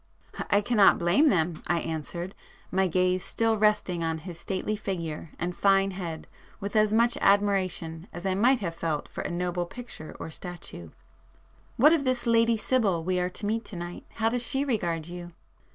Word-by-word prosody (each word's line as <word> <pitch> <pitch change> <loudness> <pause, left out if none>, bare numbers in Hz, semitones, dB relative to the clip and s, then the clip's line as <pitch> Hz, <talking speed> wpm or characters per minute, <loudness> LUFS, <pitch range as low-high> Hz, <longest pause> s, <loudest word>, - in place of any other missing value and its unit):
"I 205 - +4
cannot 210 -2 +5
blame 180 - +4
them!" 165 -3 +1
I 175 - +2
answered, 165 +3 -4 0.4
my 190 0 +2
gaze 180 +1 +1
still 225 -1 +1
resting 210 -5 +2
on 160 0 -1
his 170 +1 -8
stately 195 +3 -2
figure 170 -6 -4
and 175 +1 -3
fine 195 0 +3
head 175 -4 -5 0.3
with 200 +1 -5
as 215 -1 +4
much 235 +2 +3
admiration 190 -4 +1
as 175 +2 -8
I 190 - +1
might 240 +6 +3
have 170 -4 -2
felt 165 -3 -2
for - - -6
a - - -3
noble 175 0 -2
picture 235 -8 -9
or 160 - -6
statue—"What 175 - -3
of 320 -4 +2
this 255 -2 0
Lady 230 0 +4
Sibyl 210 -8 +1
we 180 +1 0
are 180 0 0
to 205 - -6
meet 225 +2 0
to 205 - -8
night,—how 175 +6 -3
does 245 +1 0
she 270 +3 +1
regard 170 - -1
you?" 175 0 -8
185 Hz, 175 wpm, -27 LUFS, 170-215 Hz, 0.4 s, cannot